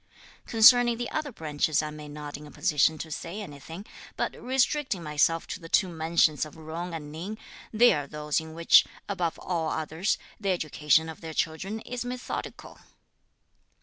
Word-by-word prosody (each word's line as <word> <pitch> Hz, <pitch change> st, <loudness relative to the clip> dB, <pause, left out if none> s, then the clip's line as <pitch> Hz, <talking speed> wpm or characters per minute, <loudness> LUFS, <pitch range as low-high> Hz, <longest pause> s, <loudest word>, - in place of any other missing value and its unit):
Concerning 240 Hz, +1 st, +7 dB
the 240 Hz, 0 st, -4 dB
other 310 Hz, -2 st, -2 dB
branches, 155 Hz, -, 0 dB
I 155 Hz, -, -3 dB
am 150 Hz, -1 st, -9 dB
not 145 Hz, -1 st, -7 dB
in 150 Hz, +1 st, -10 dB
a -, -, -12 dB
position 155 Hz, +1 st, +2 dB
to 160 Hz, +1 st, -7 dB
say 170 Hz, +6 st, -5 dB
anything; 165 Hz, +1 st, -9 dB, 0.3 s
but -, -, -1 dB
restricting 260 Hz, -, 0 dB
myself 150 Hz, +2 st, +1 dB
to -, -, -6 dB
the 165 Hz, -2 st, -11 dB
two 185 Hz, -, +3 dB
mansions 160 Hz, -2 st, +2 dB
of 155 Hz, -, -8 dB
Jung 165 Hz, +2 st, -6 dB
and 150 Hz, -2 st, -7 dB
Ning, 180 Hz, +8 st, -6 dB, 0.3 s
they 240 Hz, +2 st, +6 dB
are 145 Hz, -1 st, -2 dB
those 150 Hz, +1 st, -1 dB
in 160 Hz, 0 st, -10 dB
which, 170 Hz, 0 st, +7 dB, 0.2 s
above 180 Hz, -5 st, -2 dB
all 165 Hz, -3 st, -2 dB
others, 160 Hz, +5 st, -1 dB, 0.2 s
the 200 Hz, -2 st, -2 dB
education 160 Hz, -3 st, +2 dB
of 160 Hz, -, -9 dB
their 160 Hz, -1 st, -7 dB
children 190 Hz, +7 st, -2 dB
is 245 Hz, +1 st, -5 dB
methodical." 250 Hz, 0 st, -6 dB
165 Hz, 170 wpm, -27 LUFS, 150-205 Hz, 0.3 s, Concerning